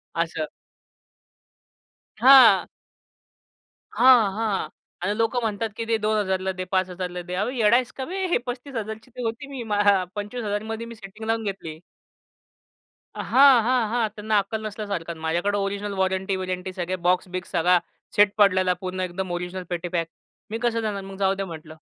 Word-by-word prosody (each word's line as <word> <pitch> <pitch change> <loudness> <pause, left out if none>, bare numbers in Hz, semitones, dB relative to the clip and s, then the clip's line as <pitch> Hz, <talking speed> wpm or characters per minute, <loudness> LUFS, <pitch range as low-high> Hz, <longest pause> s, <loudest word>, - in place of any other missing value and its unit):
असं. 160 -2 -1 1.7
हां. 245 -5 +8 1.3
हां, 245 -6 +6
हां. 215 -2 -1 0.3
आणि 205 +4 -1
लोकं 230 +2 +1
म्हणतात 220 0 -2
की 230 - -3
दे 225 0 +1
2,000 210 -3 0
ला 190 0 -2
दे, 185 0 -5
5,000 185 -1 -1
ला 180 0 -6
दे. 180 +1 -8
अहो, 205 +6 0
येडा 235 -3 +3
आहेस 250 -1 +1
का 265 - -3
बे? 380 +4 -3
हे 345 - +2
35,000 245 -4 -5
ची 255 - -22
होती. 230 +5 -4
मी 270 -4 -6 0.5
25,000 210 0 -3
मध्ये 225 +1 -5
मी 230 - -9
सेटिंग 215 +1 -10
लावून 225 0 0
घेतली. 165 -6 -5 1.4
हां, 270 -2 +6
हां, 245 -2 +2
हां. 230 -1 +1
त्यांना 215 0 0
अक्कल 215 +2 -4
नसल्यासारखं. 200 -6 -4
माझ्याकडे 175 +6 0
ओरिजिनल 200 +1 -2
वॉरंटी-विरंटी, 190 -1 -1
सगळे 180 0 -3
बॉक्स-बिक्स, 185 0 -1
सगळा 175 0 +3 0.4
सेट 205 -1 +5
पडलेला. 185 -3 +4
पूर्ण 185 0 -4
एकदम 185 0 -4
ओरिजिनल 180 +1 -4
पेटी 175 0 -3
पॅक. 165 -1 -1 0.4
मी 225 - -3
कसं 230 -1 +1
देणार 205 -2 -2
मग? 195 0 -9
जाऊ 195 -1 +2
द्या 195 0 -3
म्हटलं. 160 -2 -9
205 Hz, 155 wpm, -24 LUFS, 185-225 Hz, 1.7 s, हां